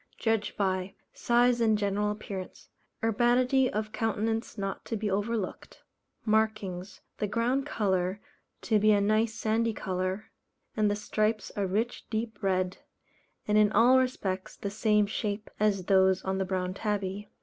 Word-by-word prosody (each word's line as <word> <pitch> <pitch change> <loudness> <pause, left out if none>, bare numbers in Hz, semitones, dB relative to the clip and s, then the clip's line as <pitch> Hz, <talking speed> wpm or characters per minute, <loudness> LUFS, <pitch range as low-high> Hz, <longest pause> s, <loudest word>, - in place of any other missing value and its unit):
Judged 225 -2 0
by: 190 -1 -1 0.2
Size 240 0 +3
and 220 -2 +4
general 205 0 0
appearance; 200 -3 -7 0.3
urbanity 245 +4 +3
of 215 0 -3
countenance 225 0 -1
not 195 -1 -4
to 225 - -3
be 210 -1 -2
overlooked. 205 0 -3 0.4
Markings 215 -4 -1 0.2
the 210 - 0
ground 245 +6 0
colour 190 -6 0 0.4
to 220 -2 +3
be 215 +1 +5
a 205 - +4
nice 215 +2 +2
sandy 225 +1 0
colour, 185 +1 -3 0.4
and 215 -1 +2
the 205 - +1
stripes 215 +1 -1
a 200 -2 0
rich 220 +6 -2
deep 220 -1 -3
red, 185 -2 0 0.7
and 210 0 +4
in 210 -1 +4
all 250 +3 +6
respects 195 -7 -2
the 200 - -5
same 210 0 +3
shape 205 +1 -3
as 200 -3 +1
those 190 -1 +4
on 190 0 -1
the 190 - 0
Brown 185 -1 -2
Tabby. 205 -1 -3
210 Hz, 150 wpm, -29 LUFS, 195-225 Hz, 0.7 s, all